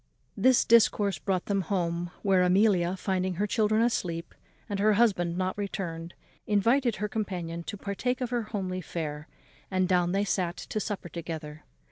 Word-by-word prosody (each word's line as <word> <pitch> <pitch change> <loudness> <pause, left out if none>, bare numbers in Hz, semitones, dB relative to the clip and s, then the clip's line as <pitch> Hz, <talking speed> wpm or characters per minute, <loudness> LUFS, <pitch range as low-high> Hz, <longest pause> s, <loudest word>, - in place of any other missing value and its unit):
This 255 -1 +4
discourse 205 -5 +4
brought 185 -1 -1
them 200 -1 0
home, 175 -2 -1
where 190 -2 +4
Amelia, 185 -1 +3
finding 185 -1 -1
her 200 +4 0
children 215 +1 +2
asleep, 170 -8 -1 0.3
and 200 -1 -3
her 215 +1 +4
husband 190 -6 +2
not 185 0 -1
returned, 175 -4 -4 0.3
invited 230 +4 +3
her 210 - -2
companion 180 -6 -3
to 205 - -5
partake 210 +6 -2
of 250 -2 -3
her 240 -1 +1
homely 190 -4 -4
fare, 155 -3 -5 0.4
and 185 -1 +1
down 180 -1 +2
they 200 +2 +1
sat 180 -2 -1
to 215 - -4
supper 205 -4 -4
together. 160 -3 -7
190 Hz, 160 wpm, -28 LUFS, 175-210 Hz, 0.4 s, This